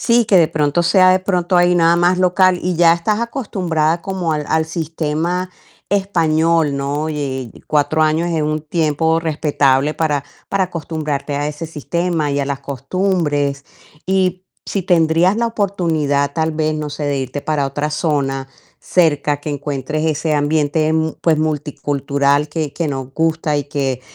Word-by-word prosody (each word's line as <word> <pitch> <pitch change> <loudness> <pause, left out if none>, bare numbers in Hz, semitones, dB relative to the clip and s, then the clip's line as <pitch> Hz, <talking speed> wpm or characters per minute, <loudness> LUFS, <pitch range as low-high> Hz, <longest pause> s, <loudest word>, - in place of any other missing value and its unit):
Sí, 235 -1 +3
que 200 - +4
de 165 - +5
pronto 155 +1 0
sea 185 +2 +5
de 185 - +4
pronto 180 -1 0
ahí 175 0 +4
nada 170 0 +4
más 175 +1 +2
local 185 0 +3
y 180 -1 -1
ya 165 0 +6
estás 190 +5 0
acostumbrada 180 - -1
como 185 -3 -2
al 150 -1 -2
al 160 0 +2
sistema 165 +2 -2 0.4
español, 165 -6 +2
¿no? 145 +3 -2
Y, 135 -5 -4 0.2
4 150 +1 +1
años 155 +2 +1
es 165 -2 0
un 155 0 -1
tiempo 160 0 0
respetable 150 -3 +1
para 150 -3 0 0.3
para 195 -1 +1
acostumbrarte 155 -4 -4
a 145 +1 -1
ese 150 +2 -6
sistema 165 0 -2
y 140 - -1
a 140 - 0
las 140 -1 -3
costumbres. 145 0 -1 0.4
Y, 185 -1 0 0.2
si 195 - -2
tendrías 170 +1 +3
la 235 +1 +1
oportunidad, 160 -10 0
tal 160 +1 -1
vez, 155 0 0
no 150 -1 -4
sé, 150 +1 -6
de 145 -1 0
irte 130 +2 -4
para 145 -2 -1
otra 145 +3 -3
zona 140 -4 -1 0.3
cerca, 150 -4 +1
que 150 - -5
encuentres 145 +2 -3
ese 155 0 0
ambiente, 150 +1 +1
mu 160 0 0
pues 160 -2 +2
multicultural 145 -1 0
que 150 -2 -3
que 170 - -2
nos 135 -2 -4
gusta 160 -1 0
y 145 - -1
que, 135 -3 -2
155 Hz, 165 wpm, -18 LUFS, 145-175 Hz, 0.4 s, ya